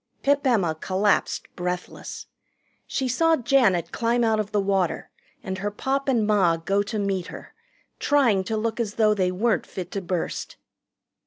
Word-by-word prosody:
Pip 285 Hz, 0 st, +2 dB
Emma 195 Hz, -10 st, +2 dB
collapsed 190 Hz, +5 st, 0 dB
breathless. 180 Hz, 0 st, -5 dB, 0.6 s
She 265 Hz, -, -1 dB
saw 325 Hz, +6 st, +3 dB
Janet 220 Hz, -, +2 dB
climb 235 Hz, +1 st, +1 dB
out 220 Hz, -1 st, +2 dB
of 210 Hz, 0 st, -3 dB
the 205 Hz, -, +1 dB
water 195 Hz, -3 st, 0 dB, 0.3 s
and 190 Hz, 0 st, -4 dB
her 205 Hz, +2 st, -1 dB
Pop 270 Hz, +6 st, -2 dB
and 235 Hz, -5 st, +2 dB
Ma 190 Hz, -6 st, +3 dB
go 195 Hz, +5 st, 0 dB
to 215 Hz, +2 st, -4 dB
meet 195 Hz, -3 st, -1 dB
her, -, -, -10 dB, 0.5 s
trying 245 Hz, -10 st, +3 dB
to 220 Hz, +3 st, -2 dB
look 225 Hz, +2 st, -2 dB
as 215 Hz, -3 st, -2 dB
though 215 Hz, -2 st, +4 dB
they 185 Hz, -3 st, +1 dB
weren't 215 Hz, +5 st, 0 dB
fit 180 Hz, -2 st, -7 dB
to 200 Hz, -, -3 dB
burst. 180 Hz, -1 st, -3 dB
205 Hz, 165 wpm, -24 LUFS, 185-235 Hz, 0.6 s, though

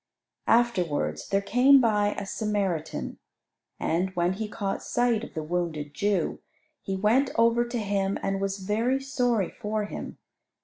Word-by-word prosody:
Afterwards 175 Hz, -, +1 dB
there 195 Hz, 0 st, +1 dB
came 260 Hz, +6 st, +6 dB
by 210 Hz, -4 st, +2 dB
a -, -, -3 dB
Samaritan, 195 Hz, -7 st, -2 dB, 0.6 s
and, 175 Hz, +4 st, 0 dB
when 175 Hz, +1 st, +1 dB
he 215 Hz, +3 st, -4 dB
caught 200 Hz, -1 st, -3 dB
sight 240 Hz, -2 st, +1 dB
of -, -, -9 dB
the 155 Hz, -, -2 dB
wounded 155 Hz, -3 st, -3 dB
Jew, 200 Hz, -1 st, 0 dB, 0.4 s
he 195 Hz, -, -3 dB
went 225 Hz, +8 st, +3 dB
over 230 Hz, +1 st, +4 dB
to 240 Hz, +1 st, -4 dB
him 200 Hz, -2 st, 0 dB
and 195 Hz, 0 st, -1 dB
was 195 Hz, 0 st, -1 dB
very 230 Hz, +6 st, +1 dB
sorry 245 Hz, -7 st, 0 dB
for 215 Hz, -2 st, -3 dB
him. -, -, -7 dB
205 Hz, 145 wpm, -27 LUFS, 190-235 Hz, 0.6 s, came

